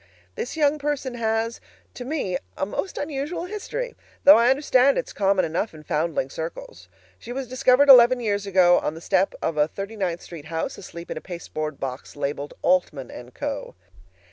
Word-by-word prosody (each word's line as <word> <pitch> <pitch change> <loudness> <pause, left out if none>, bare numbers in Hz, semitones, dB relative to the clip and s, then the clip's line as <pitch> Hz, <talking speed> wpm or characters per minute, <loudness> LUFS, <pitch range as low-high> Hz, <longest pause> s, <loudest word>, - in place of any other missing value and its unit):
This 250 - -5
young 300 -1 +2
person 285 -3 -2
has, 225 0 -1 0.3
to 245 - -7
me, 255 - -2 0.2
a - - 0
most 285 - -4
unusual 290 +4 -3
history, 430 +5 -5 0.3
though 290 - +10
I 235 +1 +4
understand 270 -1 +4
it's - - -3
common 195 -2 +2
enough 165 +4 -2
in 155 - -12
foundling 150 -3 -1
circles. 170 - -7 0.3
She 240 - -9
was 260 +1 -4
discovered 255 +2 +4
eleven 250 -1 +8
years 205 -3 -1
ago 180 -2 +5
on 150 - -3
the - - -9
bottom - - -10
step 190 +1 +1
of 165 -1 -1
a 150 0 +4
Thirty 195 +6 -7
ninth 180 -5 -2
Street 165 -4 -10
house, 165 +1 -3
asleep 170 0 -9
in - - -4
a - - -5
pasteboard 155 -4 -6
box 130 -1 -6
labeled, 145 0 -4
"Altman 160 -7 +1 0.2
& - - -39
Co." - - -4
205 Hz, 185 wpm, -24 LUFS, 165-270 Hz, 0.3 s, though